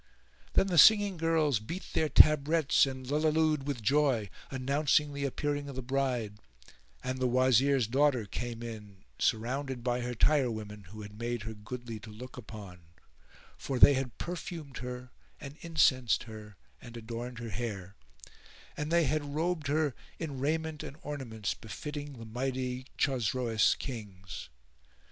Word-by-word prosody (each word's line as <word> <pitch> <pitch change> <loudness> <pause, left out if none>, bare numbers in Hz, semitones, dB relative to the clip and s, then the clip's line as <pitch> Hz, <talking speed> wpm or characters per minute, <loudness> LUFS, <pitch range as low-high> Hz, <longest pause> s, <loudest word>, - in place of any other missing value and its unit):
Then - - +4
the 180 -4 +3
singing 205 -1 +7
girls 160 -6 +2
beat 165 - -6
their 155 - +1
tabrets 155 -1 +5
and 130 -1 -6
lulliloo'd 155 0 +2
with 130 -6 -3
joy, 130 -4 +2 0.2
announcing 145 +2 +1
the 140 0 -2
appearing 145 +1 -2
of 140 - -7
the 130 - -4
bride; 125 -5 -1 0.6
and 130 0 -3
the 130 - +2
Wazir's 130 +1 +4
daughter 130 0 +2
came 120 +3 -5
in 105 -4 -9 0.2
surrounded 125 +2 -1
by 125 0 0
her 120 0 -3
tirewomen 110 -7 +1
who 105 +4 -9
had 105 +1 -11
made 120 -2 -2
her 110 0 -5
goodly 115 +1 -7
to 110 +1 -11
look 125 +5 -10
upon; 105 -6 -9 0.8
for 135 - -3
they 140 - +9
had 130 -3 -2
perfumed 165 -5 -6
her 125 0 -6 0.3
and 140 -1 -8
incensed 135 -7 +3
her 110 -2 -10 0.3
and 120 -1 -10
adorned 120 +2 -6
her 120 -1 -5
hair; 100 -2 -5 0.8
and 150 +1 -3
they 170 0 +4
had 145 -2 -1
robed 160 -1 0
her 150 -1 +1 0.2
in 145 -5 -5
raiment 155 +2 -1
and 140 - -8
ornaments 120 -8 -3
befitting 145 +5 -7
the 115 -3 -9
mighty 125 +2 -3
Chosroes 120 -4 +2
Kings. 100 - -7
130 Hz, 145 wpm, -31 LUFS, 115-145 Hz, 0.8 s, they